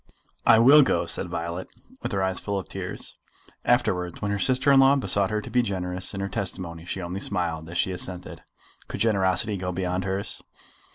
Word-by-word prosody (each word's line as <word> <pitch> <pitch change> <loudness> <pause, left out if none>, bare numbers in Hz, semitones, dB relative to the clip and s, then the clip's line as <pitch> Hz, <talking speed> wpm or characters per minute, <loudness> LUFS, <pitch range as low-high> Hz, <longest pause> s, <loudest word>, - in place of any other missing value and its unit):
"I 115 - +8
will 135 +7 +8
go," 135 - +1
said - - +2
Violet, 85 +2 -5 0.3
with - - -4
her 95 -1 0
eyes 95 0 -1
full 100 -1 -3
of 95 - -5
tears. - - -5 0.5
Afterwards 90 -1 0
when 100 -1 -2
her 100 - -1
sister 130 +5 +3
in 135 - +6
law 135 +1 +6
besought 100 -7 +1
her 105 0 -1
to 120 - -9
be 125 +2 +3
generous 90 -3 -1
in 95 - -4
her 95 - -2
testimony, 90 -4 -3
she 95 +1 -5
only 90 +2 -4
smiled 85 -5 -3
as 85 - -5
she 95 - +1
assented. 90 0 -4 0.5
Could - - -6
generosity 100 -1 +2
go 90 0 -3
beyond 90 0 -2
hers? 95 +1 -1
95 Hz, 195 wpm, -25 LUFS, 90-105 Hz, 0.5 s, I